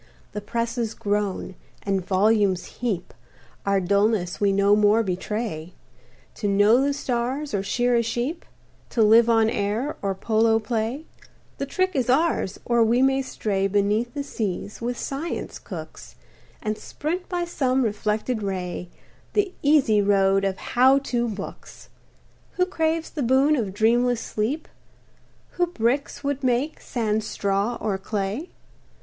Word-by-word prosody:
The 210 - -5
presses 230 +1 -2
groan, 205 -3 -2 0.3
and 195 -2 0
volumes 195 0 +2
heap, 215 -8 -2 0.5
Our 200 0 +3
dullness 200 -1 +1
we 200 -1 +4
no 200 +1 +4
more 210 +2 +4
betray; 185 -3 -4 0.6
To 210 - -2
know 205 +5 +5
the 280 +1 +2
stars, 270 +1 -2
or 200 - +1
shear 245 +5 +1
a 235 - +4
sheep 240 +8 -2 0.5
To 225 - +2
live 225 +2 +6
on 225 -1 +4
air, 220 +6 -1
or 195 -1 -1
polo 225 +2 +2
play; 230 +6 -2 0.5
The 275 - -2
trick 370 +5 0
is 255 -4 0
ours, 270 - +1
or 235 -1 +3
we 235 +3 +3
may 270 0 +3
stray 200 -6 -1
Beneath 205 +5 0
the 285 - -2
seas, 210 -6 -4
with 240 +1 -2
science 285 +5 -4
cooks, - - -9 0.5
And 215 0 -2
sprint 345 +5 -4
by 350 -1 -1
some 265 -6 +1
reflected 215 +2 -1
ray 180 -3 -4 0.4
The 400 -3 +1
easy 280 -8 +4
road 195 -1 +3
of 195 -1 -1 0.2
"How 260 +3 +6
To" 245 -3 -1
books! 205 -3 -8 0.6
Who 365 - +2
craves 325 -2 -1
the 300 - -4
boon 265 +4 +4
of 220 -8 -1
dreamless 235 +4 +2
sleep? 235 +9 -2 0.8
Who 355 0 0
bricks 270 -1 -1
would 280 -1 -2
make, 255 +4 0
sans 220 -2 -1
straw 200 +4 -1
or 200 -3 -1
clay? 205 - -3
225 Hz, 145 wpm, -24 LUFS, 205-265 Hz, 0.8 s, live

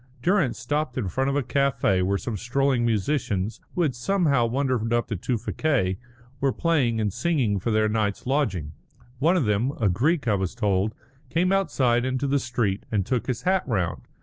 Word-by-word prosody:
Durrance 170 - +2
stopped 145 +3 -2
in 105 -7 -1
front 135 +7 0
of 140 - -1
a 145 - +1
café 125 -7 +1
where 100 +2 +1
some 115 +2 -4
strolling 125 +3 +1
musicians, 110 -3 -1 0.2
who 180 - +2
had 145 -5 +1
somehow 140 -2 +1
wandered 125 -2 0
up 120 -1 +1
to 110 - -1
Tewfikieh, 115 - -1 0.4
were 135 -1 +2
playing 130 -8 +1
and 105 -3 0
singing 130 - +1
for 115 - -2
their 110 -1 +2
night's 105 -2 -1
lodging. 110 - 0 0.5
One 165 +6 +3
of 155 - +1
them, 105 +6 +1
a 110 -4 +3
Greek 135 - +1
I 110 - +3
was 95 +1 -1
told, 105 -2 0 0.3
came 180 +3 +1
outside 135 -11 +2
into 130 +2 -1
the 140 +1 +2
street 120 -6 -1
and 100 -4 +1
took 125 +1 -1
his 125 -3 -2
hat 190 0 +2
round. 95 -9 -1
120 Hz, 185 wpm, -25 LUFS, 105-140 Hz, 0.5 s, One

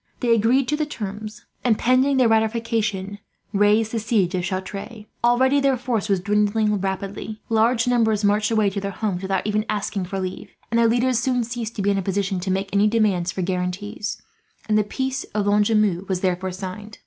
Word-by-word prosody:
They 240 -2 +3
agreed 240 +4 +3
to 300 - +2
the 300 0 -1
terms 215 -4 -7 0.2
and, 230 -4 +3
pending 260 +2 +3
their 255 -2 +5
ratification, 220 -3 0 0.3
raised 210 +2 +3
the 230 - -1
siege 210 -5 +1
of 180 -1 -1
Chartres. 200 +4 -5 0.2
Already 260 +4 +4
their 275 -2 +2
force 235 -4 -2
was 195 -2 +2
dwindling 210 +2 +1
rapidly. 195 +2 -4
Large 230 +1 +2
numbers 225 -4 +2
marched 205 +1 +2
away 215 -3 +2
to 200 0 -3
their 200 - -3
homes, 200 -2 -3
without 190 -1 -1
even 210 0 +1
asking 200 -2 -2
for 195 +2 -4
leave; 185 -1 -5 0.2
and 230 - +2
their 230 - +5
leaders 245 +1 +2
soon 250 0 +1
ceased 230 -1 -5
to 200 - -2
be 200 - +3
in 195 - +1
a - - -1
position 195 0 -1
to 185 +2 -4
make 195 +1 -1
any 205 +1 +4
demands 205 -6 +1
for 185 - -3
guarantees, 190 +4 -3 0.5
and 215 - +2
the 215 - +4
peace 265 +5 -3
of 210 -1 +1
Lonjumeau 205 -2 +2
was 185 -1 -1
therefore 185 0 0
signed. 195 +3 -7
210 Hz, 195 wpm, -22 LUFS, 195-230 Hz, 0.5 s, their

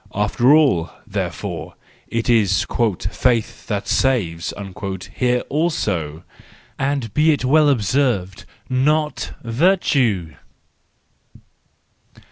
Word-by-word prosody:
After 105 +6 +2
all, 135 - +4 0.2
therefore, - - -5 0.3
it 115 0 -2
is 105 -6 +3 0.2
" 95 0 -5
faith 120 -3 0
that 105 -3 -3
saves 95 -11 0 0.3
" 95 -2 -6
here 125 -1 +1
also 90 - -2 0.6
!—and 135 -5 -1
be 155 +1 +4
it 140 -4 -1
well 150 +3 +4
observed, 105 -5 0 0.2
not 150 +4 0
virtue 120 - +1
120 Hz, 95 wpm, -20 LUFS, 95-140 Hz, 0.6 s, all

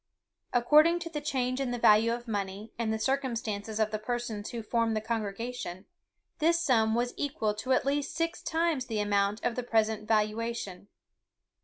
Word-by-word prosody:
According 300 +8 +5
to 335 -1 -6
the 300 -2 -3
change 260 -3 -1
in 265 - -1
the 245 - -2
value 225 0 +5
of 240 +1 -4
money, 200 0 -4
and 225 -2 0
the 220 - 0
circumstances 225 -4 -2
of 215 -1 +2
the 215 - -2
persons 225 -2 -3
who 235 -2 -5
formed 230 0 +1
the - - +2
congregation, 220 -3 -4 0.5
this 335 +2 +3
sum 225 -9 +3
was 240 +1 0
equal 270 -7 -1
to 215 +5 -4
at 255 - +3
least 285 +1 -1
six 330 +1 -1
times 320 -5 0
the 220 -3 -2
amount 205 +1 +1
of 240 - +1
the 250 - -2
present 220 -2 0
valuation. 215 -3 -1
230 Hz, 175 wpm, -29 LUFS, 215-260 Hz, 0.5 s, According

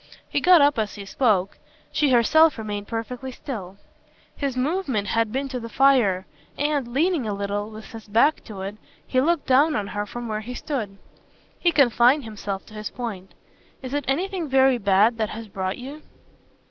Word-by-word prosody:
He - - -1
got 360 -3 +7
up 285 -4 +4
as 215 -2 -2
he 200 -2 -8
spoke; 200 -4 +1 0.3
she 295 -2 +2
herself 285 +6 +5
remained 205 -2 -5
perfectly 250 +3 -5
still. 200 -9 -7 0.6
His 275 -3 -3
movement 260 - -1
had 225 0 +1
been 270 +3 -2
to 255 -1 -4
the 230 -1 -7
fire, 230 -9 +3 0.3
and, 290 -3 0
leaning 290 +1 0
a 205 - -2
little, 200 +1 -3
with 215 +2 -11
his 225 -2 -10
back 230 +9 +3
to 205 -4 -8
it, 200 +2 -6 0.3
to 255 - +3
look 330 +1 +1
down 285 +4 +4
on 210 - -1
her 205 0 -3
from 240 +3 -6
where 215 -1 -3
he 245 +3 -7
stood, 220 -11 -4 0.6
he 345 - +3
confined 265 -1 +4
himself 205 -3 -5
to - - -16
his 215 0 -5
point. 210 -7 -7 0.5
"Is 255 +1 -6
it 290 -2 -1
anything 345 +3 -1
very 265 -1 +4
bad 205 +3 +3
that 215 -1 0
has 225 0 -7
brought 190 -1 -3
you?" 275 +5 -9
240 Hz, 185 wpm, -24 LUFS, 210-275 Hz, 0.6 s, got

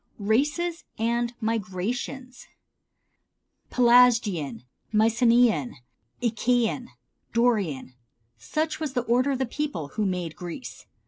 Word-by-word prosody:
Races 295 - 0
and 235 +1 0
Migrations. 230 +5 -3 1.2
Pelasgian, 230 - +4 0.3
Mycenean, 230 - +3 0.5
Achæan, 240 +1 +1 0.5
Dorian, 205 - +1 0.4
such 310 - -2
was 305 -4 -3
the 245 -3 0
order 245 +3 +2
of - - -1
the 265 - 0
peoples 250 - -4
who 210 -2 0
made 180 -4 -3
Greece. 180 +8 -8
235 Hz, 90 wpm, -26 LUFS, 195-250 Hz, 1.2 s, Pelasgian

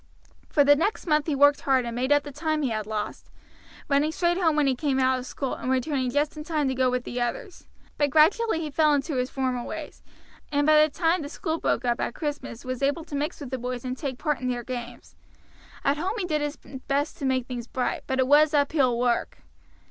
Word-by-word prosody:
For 290 - +4
the 290 +1 +6
next 370 +9 -1
month 305 -2 +2
he 300 - 0
worked 285 +1 +5
hard 265 -3 +2
and 235 -1 -4
made 255 +3 -1
up 290 0 +4
the 290 - -8
time 310 +1 -1
he 265 - +1
had 215 -2 -3
lost, 215 -1 -5 0.6
running 290 +2 +2
straight 345 +2 +1
home 325 -4 +2
when 300 -1 +3
he 270 - +3
came 265 +1 0
out 260 0 +3
from 255 - -5
school, 265 +1 -4
and 255 - -5
returning 260 0 0
just 290 +4 0
in 305 - -6
time 300 -2 -1
to - - 0
go 260 0 +1
in - - +1
with 250 -1 -1
the 245 0 -4
others; 390 - -4 0.3
but 290 -1 +3
gradually 325 - +3
he 305 -2 -4
fell 305 0 +4
into 280 0 -2
his 250 0 0
former 255 -2 -2
ways, - - -7 0.5
and 290 0 +2
by 305 0 +6
the 305 - +4
time 330 +3 +1
the 285 - -6
school 325 0 -3
broke 240 - 0
up 240 -1 0
at - - -2
Christmas 290 -6 -5
was 255 0 -4
able 285 +4 0
to 310 - -7
mix 295 +2 -2
with 275 -3 -7
the 260 - -2
boys 250 0 -4
and 255 0 -2
take 265 -2 -4
part 300 -1 -1
in 255 - -3
their 245 -1 -2
games. 240 -1 -7 0.7
At 280 +1 +2
home 375 +7 -2
he 395 - -2
did 305 -4 -1
his 295 0 -3 0.3
best 285 +2 0
to 280 - -3
make 260 -2 +1
things 245 -2 -6
bright, 255 -1 -2
but 265 - -1
it 260 - +3
was 300 +2 +5
uphill 280 -4 +2
work. 240 -1 -1
285 Hz, 245 wpm, -26 LUFS, 255-305 Hz, 0.7 s, the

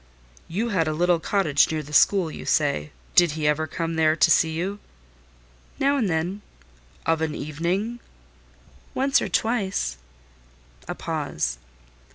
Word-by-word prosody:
"You 220 +8 -2
had 175 -7 +1
a 155 - 0
little 175 +1 +2
cottage 165 -5 +2
near 155 -1 -2
the 150 +1 -12
school, 180 +1 +4
you - - -8
say: 140 - 0 0.2
did 175 -4 +5
he 155 -1 -1
ever 155 +1 +1
come 165 +1 -3
there 155 -1 +4
to - - +4
see 160 - +4
you?" 180 +6 -3 1.0
"Now 280 +1 +2
and 235 -8 +1
then?" 175 +5 -1 0.6
"Of 165 -1 +1
an 155 -1 -1
evening?" 175 +11 -2 1.0
"Once 270 +1 +3
or - - -2
twice." 195 - 0 0.9
A - - -4
pause. - - -3
165 Hz, 145 wpm, -24 LUFS, 155-195 Hz, 1.0 s, did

